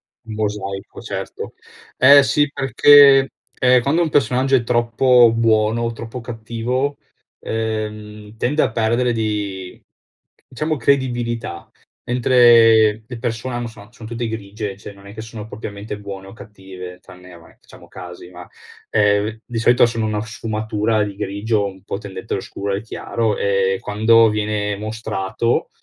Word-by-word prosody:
Un 110 -2 -13
mosaico 100 -2 -4
certo. - - -6 0.4
Ehm, 140 +2 +8
sì 145 +4 +1
perché, 140 0 +6 0.3
ehm, 125 -1 +4
quando 150 +7 +1
un 160 - -1
personaggio 135 -1 +2
è 120 - +2
troppo 120 0 +4
buono 110 0 +2
o 115 0 -1
troppo 115 +1 -8
cattivo, 120 +4 -3 0.4
ehm, 105 -1 -5
tende 145 +7 0
a - - +1
perdere 120 +2 +1
di 105 -4 -4 0.7
diciamo 155 +5 -2
credibilità, 120 -8 -1 0.3
mentre 115 -3 +5
le 120 -1 -7
persone 120 +1 -4
hanno 120 -1 -3
son 105 -1 -14
sono 115 -2 -11
tutte 120 0 -3
grigie, 105 -2 -6
cioè 105 - -10
non 100 0 -16
è 100 - -11
che 110 - -8
sono 110 -1 -9
propriamente 105 -1 -7
buone 100 -1 -8
o 95 - -12
cattive 95 -4 -11
tranne, 90 0 -15
ehm, 85 - -13
vabbè 80 - -20
facciamo - - -17
casi 90 -1 -11
va; 90 -1 -12 0.4
ehm, 105 +1 +1
di 120 - -7
solito 120 +2 +4
sono 115 -1 -2
una 105 -1 -2
sfumatura 110 0 -2
di 100 -1 -5
grigio 100 +2 -1
un 95 -1 -8
po' 100 - -4
tendente 95 -3 -7
allo - - -2
scuro 100 0 -4
e - - +1
al 100 - -5
chiaro, 110 -1 -2
e 95 -1 +1
quando 110 +2 +4
viene 105 -1 -2
mostrato 110 0 -2
110 Hz, 155 wpm, -19 LUFS, 105-120 Hz, 0.7 s, Ehm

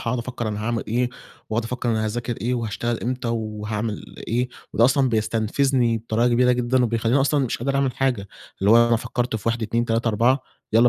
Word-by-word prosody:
هاقعُد 120 +1 -1
أفكر 120 -1 -4
أنا 105 0 -3
هاعمل 115 -1 -1
إيه، 120 +3 +1 0.4
وأقعُد 110 +1 0
أفكر 120 +1 -2
أنا 110 -1 0
هاذاكر 120 +2 -3
إيه، 125 +2 0
وهاشتغل 115 0 -2
إمتى 125 0 -2
وهاعمل 110 -1 -4
إيه؟ 125 +2 0 0.2
وده 115 - +4
أصلًا 130 +1 +4
بيستنفزني 115 +2 +1
بطريقة 115 +2 +1
كبيرة 125 +1 +4
جدًا، 125 +1 +2
وبيخلّيني 115 +3 +1
أصلًا 140 0 +2
مش 120 - -2
قادر 135 +3 -1
أعمل 135 -2 +1
حاجة، 125 -7 0 0.3
اللي 100 - +3
هو 115 +1 +7
أنا 115 - +4
فكرت 120 0 -2
في 110 +2 -3
1 115 0 -1
2 115 +2 0
3 115 0 0
4 120 +5 +2 0.3
يالّا 115 +3 +6
120 Hz, 200 wpm, -23 LUFS, 110-125 Hz, 0.4 s, هو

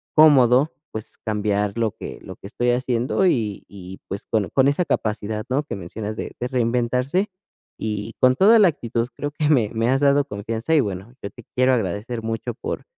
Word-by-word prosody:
cómodo, 140 -2 +6 0.2
pues, 110 -1 -8
cambiar 105 -1 -1
lo 115 -2 +1
que - - -8
lo - - -9
que - - -10
estoy 120 +3 -1
haciendo 125 +7 0
y 110 - -1
y 95 -1 -10
pues 100 +2 -6
con 110 -4 0
con 135 0 +4
esa 160 +5 0
capacidad, 110 -3 -2
¿no?, 140 +4 +1
que 150 - -6
mencionas 105 +4 -6
de - - -5
de 125 - -2
reinventarse 125 - 0 0.5
y 105 +1 -3
con 130 0 +5
toda 210 - +6
la 200 -4 +7
actitud, 120 -5 -3
creo 145 - -4
que 150 0 -1
me 120 -9 +3
me 115 +1 +1
has 135 +1 +3
dado 140 0 +4
confianza 115 +3 -3
y - - +5
bueno, 100 +1 -5
yo 100 - -4
te 120 - -14
quiero 130 +1 +4
agradecer 115 +2 -2
mucho 115 +2 -3
por - - -5
120 Hz, 195 wpm, -22 LUFS, 105-135 Hz, 0.5 s, la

